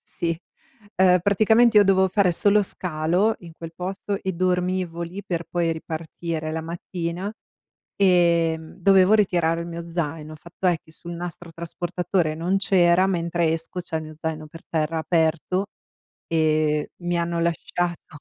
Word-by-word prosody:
Sì. 165 -1 -3 0.6
Uhm, 185 -1 +6
praticamente 220 +3 +4
io 205 - +7
dovevo 190 -1 +4
fare 190 -1 +2
solo 205 +4 +4
scalo 180 +4 0
in 170 -2 -11
quel 165 0 -9
posto 195 +3 -4
e 190 - -1
dormivo 180 -1 -1
lì 180 +4 -6
per 170 -2 -3
poi 170 -2 0
ripartire 160 0 -5
la 160 - -2
mattina. 170 +3 -4 0.6
Ehm, 170 -4 +2
dovevo 190 +1 +5
ritirare 175 -5 +2
il 170 - -5
mio 170 0 -7
zaino. 160 -2 -3
Il 155 - -11
fatto 170 +4 -5
è 175 -2 +4
che 160 - -19
sul 170 +2 -9
nastro 175 0 -7
trasportatore 170 0 -2
non 175 +4 0
c'era, 185 -2 +4
mentre 170 -2 0
esco 165 +3 -4
c'è 170 -2 -4
il 160 - -3
mio 155 0 -9
zaino 160 0 -4
per 165 +2 -13
terra, 160 0 -1
aperto, 165 +3 0 0.6
e 155 -2 +1
mi 175 0 0
hanno 170 0 -1
lasciato 170 +1 -2
170 Hz, 155 wpm, -24 LUFS, 165-185 Hz, 0.6 s, io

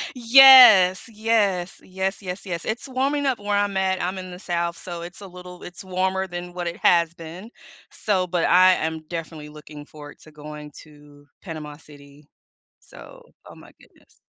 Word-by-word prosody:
Yes. 240 -7 +7
Yes. 210 -5 -1
Yes, 190 +2 -5
yes, 185 +1 -8
yes. 170 -3 -6
It's 230 +5 -5
warming 275 +2 -2
up 260 -5 -1
where 205 0 -2
I'm 205 -1 -1
at. 190 -1 -1
I'm 185 +2 -4
in 185 0 -9
the 180 - -10
South, 170 -2 -4
so 175 -2 -9
it's 175 +4 -11
a 195 - -10
little 180 0 -13
it's 175 +1 -11
warmer 190 +1 -2
than 175 0 -8
what 175 -1 -5
it 170 - -6
has 170 -1 +3
been. 170 +7 -11 0.4
So 190 -4 -2
But 175 -1 -1
I 185 +1 +5
am 160 -1 -3
definitely 160 -3 -8
looking 150 -1 -13
forward 145 -1 -14
to 155 - -18
going 150 0 -11
to 145 -1 -19 0.2
Panama 150 -4 -9
City. 145 -1 -19 0.5
So - - -16 0.2
Oh - - -14
my - - -17
goodness. - - -26
180 Hz, 175 wpm, -22 LUFS, 160-195 Hz, 0.5 s, Yes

